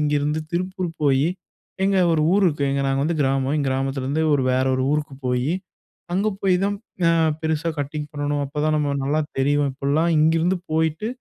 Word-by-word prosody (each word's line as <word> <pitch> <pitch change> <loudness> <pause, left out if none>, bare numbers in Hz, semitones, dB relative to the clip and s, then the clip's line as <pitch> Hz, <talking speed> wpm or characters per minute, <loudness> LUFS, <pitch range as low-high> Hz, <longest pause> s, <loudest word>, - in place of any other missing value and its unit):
இங்கிருந்து 150 +1 0
திருப்பூர் 185 0 -2
போயி, 140 +1 +3 0.6
எங்க 195 0 +2 0.2
ஒரு 155 - +2
ஊர் 200 0 +4
இருக்கு, 145 -3 0
எங்க 140 0 0
நாங்க 135 0 +1
வந்து 165 +2 0
கிராமம். 135 +1 +1
எங்க 140 -3 0
கிராமத்துலருந்து 135 +2 -1
ஒரு 140 - +1
வேற 130 +1 +2
ஒரு 130 - 0
ஊருக்கு 150 -2 -2
போயி, 125 +4 0 0.6
அங்க 195 +4 +1
போய் 190 -2 +3
தான் 205 - 0 0.3
அ - - +5 0.3
பெருசா 160 +1 -1
கட்டிங் 145 +1 -4
பண்ணணும், 145 0 -1
அப்போ 140 +2 -10
தான் 155 - +2
நம்ம 145 -1 0
நல்லா 145 +3 +1 0.2
தெரிவோம் 145 +1 +2
இப்பிடிலாம் 145 +5 +1
இங்கிருந்து 165 +4 +3 0.2
போயிட்டு 160 +5 0
150 Hz, 175 wpm, -22 LUFS, 140-160 Hz, 0.6 s, அ